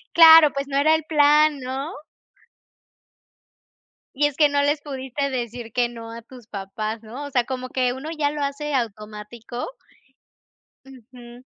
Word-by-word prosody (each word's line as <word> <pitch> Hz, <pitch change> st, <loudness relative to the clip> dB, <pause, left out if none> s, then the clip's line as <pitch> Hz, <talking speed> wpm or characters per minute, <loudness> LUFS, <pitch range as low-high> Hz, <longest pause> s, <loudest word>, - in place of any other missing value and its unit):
Claro, 320 Hz, -2 st, +9 dB
pues, 275 Hz, 0 st, -3 dB
no 275 Hz, 0 st, -2 dB
era 310 Hz, +3 st, +4 dB
el 320 Hz, -, -2 dB
plan, 300 Hz, -1 st, +4 dB
¿no? 265 Hz, +4 st, -5 dB, 2.2 s
Y 290 Hz, +1 st, +3 dB
es 285 Hz, -, -8 dB
que 300 Hz, -, +5 dB
no 285 Hz, 0 st, +1 dB
les 290 Hz, +1 st, +1 dB
pudiste 275 Hz, 0 st, -4 dB
decir 235 Hz, -2 st, -5 dB
que 240 Hz, -1 st, +1 dB
no 230 Hz, -1 st, -9 dB
a 230 Hz, 0 st, -8 dB
tus 245 Hz, 0 st, -15 dB
papás, 215 Hz, +2 st, -5 dB
¿no? 240 Hz, +6 st, -8 dB
O 285 Hz, -, -8 dB
sea, 245 Hz, -2 st, +1 dB
como 255 Hz, -1 st, -5 dB
que 250 Hz, -1 st, 0 dB
uno 275 Hz, +5 st, -7 dB
ya 290 Hz, -1 st, 0 dB
lo 295 Hz, -1 st, -3 dB
hace 285 Hz, +1 st, -3 dB
automático. 220 Hz, +1 st, -5 dB, 1.2 s
Ujú. 245 Hz, -1 st, -14 dB
260 Hz, 155 wpm, -23 LUFS, 235-290 Hz, 2.2 s, Claro